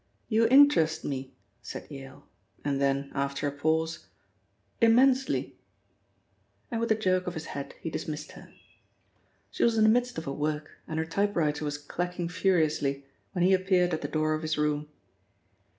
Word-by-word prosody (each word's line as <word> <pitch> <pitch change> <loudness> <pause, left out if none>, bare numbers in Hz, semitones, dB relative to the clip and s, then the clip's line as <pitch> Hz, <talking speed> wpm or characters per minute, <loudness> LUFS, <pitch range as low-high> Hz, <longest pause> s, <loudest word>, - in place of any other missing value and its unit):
You 225 0 +4
interest 265 - +5
me," 135 -2 -4 0.3
said - - -7
Yale, 135 0 -10 0.4
and 140 -1 0
then, 140 0 0
after 140 +1 -1
a - - -1
pause, 160 +2 -1 0.7
"immensely!" 255 +4 +3 1.1
And 230 -1 -1
with 230 - 0
a - - +5
jerk 185 -3 0
of 180 - -3
his 160 - -5
head 140 -1 -6
he 165 - -4
dismissed 155 -1 -5
her. - - -13 1.0
She - - -1
was 230 -1 +3
in 220 - +4
the 215 - +6
midst 245 +1 +1
of 160 - -4
her 140 - -3
work 150 +1 -2 0.2
and 160 - -4
her 160 - 0
typewriter 165 -5 0
was 145 -1 -2
clacking 175 +3 -4
furiously 155 -7 +1 0.3
when 180 -3 0
he 190 - +5
appeared 185 -2 +2
at 160 - -1
the - - -3
door 155 0 0
of 155 - -2
his 155 -1 -2
room. 150 0 0
160 Hz, 165 wpm, -28 LUFS, 145-190 Hz, 1.1 s, the